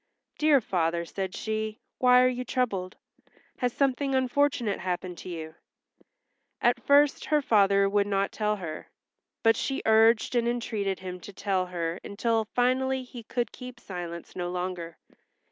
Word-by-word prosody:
"Dear 300 -3 +5
father," 170 -4 0
said 190 +2 -4
she, 220 0 -3 0.2
"why 250 0 +6
are - - +5
you 250 0 -2
troubled? 205 -9 -2 0.6
Has 250 -1 +1
something 275 +1 0
unfortunate 260 -4 +1
happened 180 -1 -4
to - - -8
you?" 160 -2 -6 1.1
At - - +2
first 285 0 +4
her 300 -1 +3
father 200 -6 +4
would 200 0 +2
not 195 -1 0
tell 210 -1 0
her, 165 -6 -7 0.5
but 225 0 +5
she 270 - -2
urged 225 +1 +4
and 235 -1 +2
entreated 220 -5 -1
him 180 -1 -6
to 205 - -10
tell 190 -1 -1
her 170 -1 -3
until 225 +2 0
finally 260 +1 +1
he 245 -1 -10
could 235 +2 -3
keep 250 -1 -10
silence 175 -4 -7
no 175 -1 -3
longer. 180 -2 -4
215 Hz, 150 wpm, -27 LUFS, 185-250 Hz, 1.1 s, why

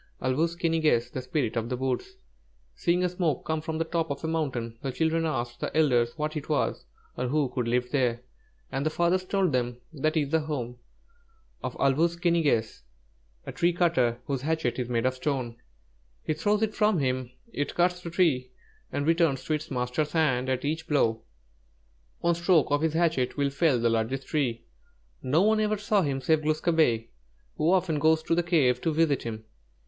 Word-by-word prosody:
ĀL 130 - +1
WŪS 165 +2 +1
KI 170 -1 0
NI 165 0 +1
GESS, 120 -6 +2
THE 130 - -4
SPIRIT 125 -3 -2
OF 115 +1 -2
THE 125 - -2
WOODS 130 - -2 0.6
Seeing 175 +1 +1
a 180 - +2
smoke 170 -6 -1
come 160 0 -1
from 160 0 -4
the 165 - +1
top 165 0 -2
of 140 +1 -4
a - - -1
mountain, 130 -8 -2
the 135 - -3
children 160 +3 0
asked 120 -5 -3
the - - -3
elders 120 -6 +2
what 155 +1 -2
it 150 0 -5
was, 150 - 0 0.3
or 125 - -1
who 145 0 +1
could 125 -2 -2
live 125 +1 0
there, 125 -4 +1 0.5
and 135 - -2
the 155 - +1
fathers 175 +3 +1
told 190 -2 +1
them: 125 -2 -1 0.2
"That 155 +2 0
is 145 -3 +1
the 160 - +3
home 130 -6 -4 0.9
of - - -4
'Āl 135 -1 +3
wūs 170 +4 +1
ki 175 -1 +2
ni 170 0 +3
gess,' 115 -8 0 0.6
a - - -5
tree 175 +1 +1
cutter, 165 -10 +2
whose 135 -3 -2
hatchet 155 -4 -1
is 125 -1 -3
made 120 0 0
of 130 - +2
stone. 130 -3 -3 0.7
He 155 - 0
throws 205 +7 +1
it 215 -1 0
from 210 -3 +2
him; 130 -3 -1 0.2
it 145 -1 -3
cuts 180 0 +2
the 170 - -6
tree 155 -8 +1 0.4
and 145 - -2
returns 165 -4 +2
to 155 - -1
its 155 0 -3
master's 125 +4 -2
hand 130 -6 +1
at 130 +1 -1
each 160 +2 -2
blow. 115 -7 +1 1.0
One 170 0 +3
stroke 170 -3 +2
of 145 0 +2
his 160 -1 +1
hatchet 160 -7 +1
will 140 -1 +1
fell 140 -3 +2
the 120 - +2
largest 115 +4 -1
tree. 120 -6 -1 0.6
No 150 +8 +2
one 215 +1 +3
ever 215 0 +1
saw 205 0 +1
him 140 -5 -1
save 155 +3 +2
Glūs 155 0 0
kābé, 120 -10 +2 0.5
who 155 +3 +2
often 175 -5 +2
goes 160 +1 +3
to - - 0
the 170 - +3
cave 145 -8 +2
to 165 - 0
visit 155 -3 +2
him. 110 -1 -6
150 Hz, 205 wpm, -27 LUFS, 125-165 Hz, 1.0 s, the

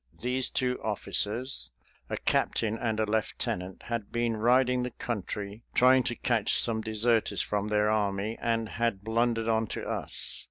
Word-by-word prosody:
These 125 +2 0
two 125 -1 0
officers, 105 - -1 0.4
a - - -2
captain 110 -1 +1
and 110 -2 -2
a 110 - +2
lieutenant, 95 -3 -2
had 115 -4 -4
been 120 -1 0
riding 125 +3 +3
the 125 - -2
country 105 -3 -5
trying 130 +1 +6
to 120 - -1
catch 115 -4 +1
some 110 -2 +4
deserters 110 -2 +1
from 105 0 -2
their 105 0 +2
army 105 0 0
and 115 -1 0
had 110 -3 -1
blundered 115 0 +1
on 110 -1 +1
to - - -5
us. - - -2
110 Hz, 155 wpm, -29 LUFS, 105-120 Hz, 0.4 s, trying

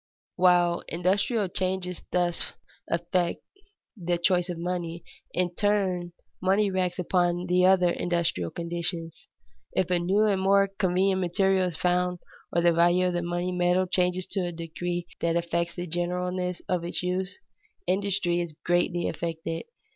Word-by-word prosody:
While 175 -1 +4
industrial 195 +5 +1
changes 185 -1 -2
thus 175 -1 0 0.4
affect 170 +1 0 0.5
the 175 -3 -1
choice 180 0 +2
of 175 - -3
money, 170 -1 -3 0.3
in 180 -1 0
turn 185 -3 0 0.3
money 195 +2 +2
reacts 185 -1 0
upon 175 -1 +1
the 180 +1 +4
other 180 -2 +5
industrial 170 - -1
conditions. 170 - -4 0.5
If 185 -1 0
a 180 - +3
new 190 +4 +2
and 200 -3 +2
more 195 +1 +4
convenient 190 0 +1
material 190 +1 +2
is 170 -3 -5
found, 180 +1 +1 0.3
or 170 - +1
the 170 -1 +5
value 175 +2 +4
of - - -3
the 175 - 0
money 175 +1 -2
metal 180 +1 +2
changes 180 0 0
to 195 - 0
a 175 -2 -1
degree 175 +1 -4
that 170 0 0
affects 170 0 -1
the 175 - -4
generalness 180 +1 -2
of 180 -2 0
its 175 +1 -2
use, 185 - -2 0.5
industry 190 -3 +1
is 170 -3 -6
greatly 175 0 +1
affected. 165 -1 -4
180 Hz, 145 wpm, -27 LUFS, 175-185 Hz, 0.5 s, other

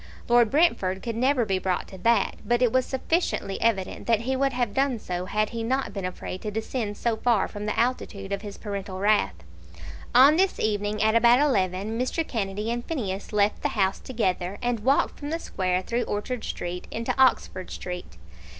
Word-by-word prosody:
Lord 240 -2 +5
Brentford 200 - +2
could 230 -2 -3
never 255 +1 +2
be 190 -2 0
brought 185 -1 -1
to 190 - -10
that; 230 +5 +2
but 240 +1 +1
it 240 - +3
was 260 -1 +2
sufficiently 265 - -1
evident 200 -5 0
that 225 -2 +3
he 260 +3 -1
would 275 +1 +1
have 245 -5 -1
done 270 -1 +1
so, 180 -4 -4
had 215 +2 0
he 230 -1 -4
not 260 +4 -1
been 195 -3 -4
afraid 185 0 -5
to 215 - -3
descend 220 0 -3
so 230 -2 0
far 235 -3 +2
from 205 0 -6
the 210 - -1
altitude 220 -5 -1
of 200 0 -2
his 205 -2 -8
paternal 200 -2 -5
wrath. 200 - +2 0.8
On 275 +5 +8
this 380 +1 +2
evening, 210 0 0
at 220 0 +3
about 235 +1 +6
eleven, 210 -5 +1
Mr. 305 +6 -1
Kennedy 210 0 -2
and 240 0 -2
Phineas 205 - -4
left 210 0 +1
the - - +1
house 190 -1 +2
together, 195 -6 -2
and 245 -2 -1
walked 265 +6 +1
from 290 - -5
the 325 - -1
Square 185 - -1
through 240 +4 -1
Orchard 220 +3 -3
Street 175 +1 -5
into 230 +1 -2
Oxford 185 -7 +2
Street. 180 - -7
220 Hz, 195 wpm, -26 LUFS, 195-245 Hz, 0.8 s, On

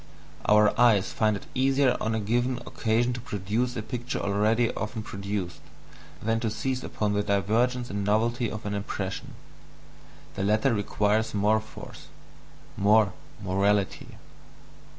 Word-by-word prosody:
Our 105 0 +5
eyes 110 -6 +4
find 110 -1 +2
it - - -12
easier 135 0 +3
on 110 0 0
a - - 0
given 120 +4 0
occasion 120 -1 0
to 125 - -5
produce 115 +1 -2
a 110 - -3
picture 120 +2 -4
already 110 +4 +1
often 110 0 -4
produced, 100 -3 -4 0.6
than 115 +1 +1
to 115 - -1
seize 130 +4 -2
upon 105 -1 -1
the 105 - +1
divergence 115 +5 +1
and 100 0 -2
novelty 115 +4 +1
of 110 -2 -7
an 105 - -2
impression: 100 -2 -4 1.0
the - - -5
latter 110 +6 +2
requires 105 +1 0
more 105 +2 +3
force, 110 - -11 0.7
more 105 0 +4 0.3
"morality." 100 +1 0
110 Hz, 135 wpm, -27 LUFS, 100-120 Hz, 1.0 s, Our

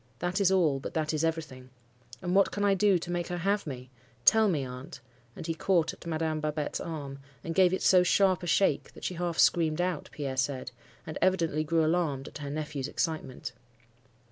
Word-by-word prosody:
That 180 +3 -1
is 190 -1 +4
all: 160 -8 +3
but - - -7
that 155 0 0
is 155 0 0
everything. 155 -6 -3 0.5
And 180 0 -1
what 195 0 +5
can 205 0 -1
I 200 - +4
do 195 -1 +4
to 175 +1 -6
make 175 -1 -2
her 175 - -3
have 200 +2 0
me? 130 -2 -7 0.3
Tell 220 -1 +6
me, 150 -7 0
aunt,' 125 +1 -9 0.4
and - - -7
he 165 - -1
caught 165 -1 +1
at - - -12
Madame 160 -1 -1
Babette's 150 -1 -2
arm, 140 -4 -6 0.2
and 165 - -3
gave 185 0 +5
it 185 - -1
so 185 -1 +6
sharp 185 0 +3
a 175 - -5
shake, 195 +4 +2
that - - -13
she - - -2
half 175 -1 -3
screamed 160 -2 +3
out, 180 -3 -1
Pierre 135 -3 -4
said, 130 -1 -1 0.3
and 155 - -6
evidently 165 -5 +2
grew 160 +1 +2
alarmed 155 -5 0
at - - -9
her 145 -1 -5
nephew's 150 -2 -4
excitement. 145 -5 -3
160 Hz, 205 wpm, -29 LUFS, 150-180 Hz, 0.5 s, Tell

